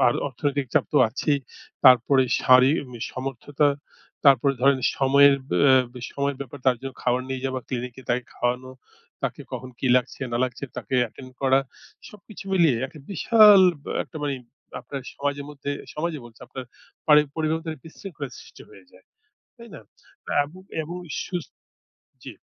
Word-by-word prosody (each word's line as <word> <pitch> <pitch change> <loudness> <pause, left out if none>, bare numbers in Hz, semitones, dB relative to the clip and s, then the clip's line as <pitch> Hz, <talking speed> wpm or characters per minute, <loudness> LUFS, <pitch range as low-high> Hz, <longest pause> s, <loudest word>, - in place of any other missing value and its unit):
আর 120 - +3
অর্থনৈতিক 140 +1 -2
চাপ - - +4
তো - - +2
আছেই। 140 +5 0 0.5
তারপরে 130 +1 +6 0.2
শারীরিক 130 +2 +4 0.2
সমর্থতা। 135 +3 -1 0.6
তারপরে 140 0 +5
ধরেন 135 +1 +4 0.2
সময়ের, 140 +1 +5 0.6
বে 125 - -10
সময়ের 140 -1 -2
ব্যাপার। 140 +1 -7
তার 130 -1 +4
জন্য 135 0 -6
খাবার 125 +1 +1
নিয়ে 130 -1 -4
যাওয়া, 130 -1 -3
clinic 125 -1 -4
এ - - -14
তাকে 125 0 0
খাওয়ানো, 125 +1 -2 0.5
তাকে - - -3
কখন 130 - -6
কি 130 - -2
লাগছে 125 0 -2
না 120 - 0
লাগছে 125 +2 -5
তাকে 125 +1 -5
attend 130 +3 -13
করা। 135 0 +4 0.5
সবকিছু 210 -1 -13
মিলিয়ে 165 -9 +4
একটা 150 - -14
বিশাল 210 +1 +7 0.2
ব - - -27
অ - - -1
একটা - - -12
মানি 145 -1 -1 0.5
আপনার 140 - -7
সমাজের 145 0 -3
মধ্যে, 145 -1 -6 0.2
সমাজে 155 0 -3
বলছি, 115 -1 -16
আপনার 130 - -8 0.4
পারি 150 -1 +7 0.2
পরিবারের 160 0 0
মধ্যে 165 0 -5
বিশৃঙ্খলা 160 -3 -8
সৃষ্টি - - -15
হয়ে 95 -2 -17
যায়। - - -20 0.5
তাই - - -12
না? - - -9 0.5
তা - - -4
এবং 165 +6 -13 0.2
এবং 170 +3 -7 0.3
সুস্ 175 -4 -5 0.7
জি। - - -9
140 Hz, 160 wpm, -24 LUFS, 130-150 Hz, 0.7 s, বিশাল